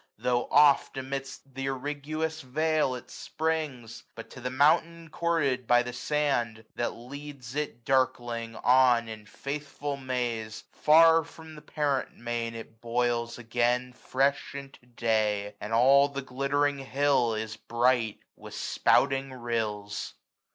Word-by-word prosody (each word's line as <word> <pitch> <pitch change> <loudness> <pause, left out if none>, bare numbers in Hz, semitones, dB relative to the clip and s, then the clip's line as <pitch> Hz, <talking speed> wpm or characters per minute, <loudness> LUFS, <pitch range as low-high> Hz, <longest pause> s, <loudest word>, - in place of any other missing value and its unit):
Though 125 -1 0
oft 145 -2 +5
amidst 135 +1 -5
th' 135 - -9
irriguous 145 +4 -3
vale 155 +1 0
it 125 - -10
springs; 150 -8 -3
But 115 - -10
to 125 - -10
the 125 - -2
mountain 165 +4 +2
courted 145 -8 0
by 120 0 +5
the 125 0 -6
sand, 125 -5 -1
750 - - -4
That 120 - -1
leads 135 0 -9
it 145 -5 -4
darkling 120 -3 0
on 125 -2 +4
in 110 -2 -9
faithful 145 +3 -5
maze. 120 -5 -3
Far 165 +1 +6
from 160 0 -13
the 150 - -11
parent 145 -4 -2
main, 120 0 -3
it 115 0 -10
boils 120 0 -1
again 120 +2 0
Fresh 135 +2 -1
into 140 -3 -10
day; 110 -4 0
and 105 - -6
all 135 +5 +6
the 140 -1 -5
glittering 140 +2 0
hill 135 -3 +1
Is 110 0 -4
bright 120 -1 0
with - - -11
spouting 135 -1 +2
rills. 110 -4 -3
130 Hz, 135 wpm, -28 LUFS, 120-145 Hz, -, Far